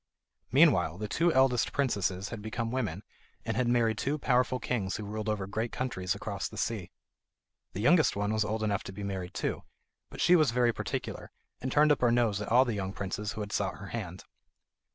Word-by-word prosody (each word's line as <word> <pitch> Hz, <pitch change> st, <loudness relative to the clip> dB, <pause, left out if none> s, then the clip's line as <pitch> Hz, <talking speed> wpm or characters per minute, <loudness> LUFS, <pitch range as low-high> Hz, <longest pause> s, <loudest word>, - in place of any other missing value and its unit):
Meanwhile 95 Hz, -, +4 dB
the 105 Hz, +1 st, -4 dB
two 170 Hz, +10 st, +2 dB
eldest 130 Hz, -4 st, +3 dB
princesses 100 Hz, -8 st, 0 dB
had 115 Hz, -, -6 dB
become 115 Hz, +2 st, -3 dB
women, 110 Hz, -7 st, -2 dB, 0.4 s
and -, -, -2 dB
had 125 Hz, 0 st, +1 dB
married 115 Hz, -2 st, +2 dB
two 145 Hz, +3 st, 0 dB
powerful 125 Hz, -2 st, +1 dB
kings 110 Hz, -6 st, -2 dB
who 110 Hz, -, -4 dB
ruled 110 Hz, +1 st, -4 dB
over 105 Hz, -3 st, -1 dB
great 110 Hz, +4 st, -3 dB
countries 95 Hz, -8 st, -2 dB
across 100 Hz, -1 st, -4 dB
the 110 Hz, -, -11 dB
sea. 105 Hz, -5 st, -2 dB, 0.8 s
The 100 Hz, -, -4 dB
youngest 155 Hz, +4 st, +4 dB
one 105 Hz, +1 st, -1 dB
was 110 Hz, 0 st, +2 dB
old 110 Hz, +1 st, -2 dB
enough 100 Hz, -2 st, 0 dB
to -, -, -6 dB
be 100 Hz, +2 st, -7 dB
married 95 Hz, -3 st, -4 dB
too, -, -, -2 dB, 0.5 s
but -, -, -11 dB
she 180 Hz, -, +5 dB
was 155 Hz, -4 st, +4 dB
very 120 Hz, -1 st, +2 dB
particular, -, -, -5 dB, 0.3 s
and 130 Hz, -, -3 dB
turned 150 Hz, +2 st, +5 dB
up 145 Hz, -, +2 dB
her 120 Hz, -1 st, +4 dB
nose 115 Hz, -4 st, +2 dB
at 105 Hz, -, -4 dB
all 125 Hz, +3 st, +6 dB
the 120 Hz, -, -1 dB
young 95 Hz, -2 st, -3 dB
princes 100 Hz, +2 st, -4 dB
who 110 Hz, -, -5 dB
had 105 Hz, 0 st, -5 dB
sought 100 Hz, -2 st, -1 dB
her 100 Hz, -2 st, -9 dB
hand. 95 Hz, -6 st, -6 dB
110 Hz, 210 wpm, -30 LUFS, 100-125 Hz, 0.8 s, all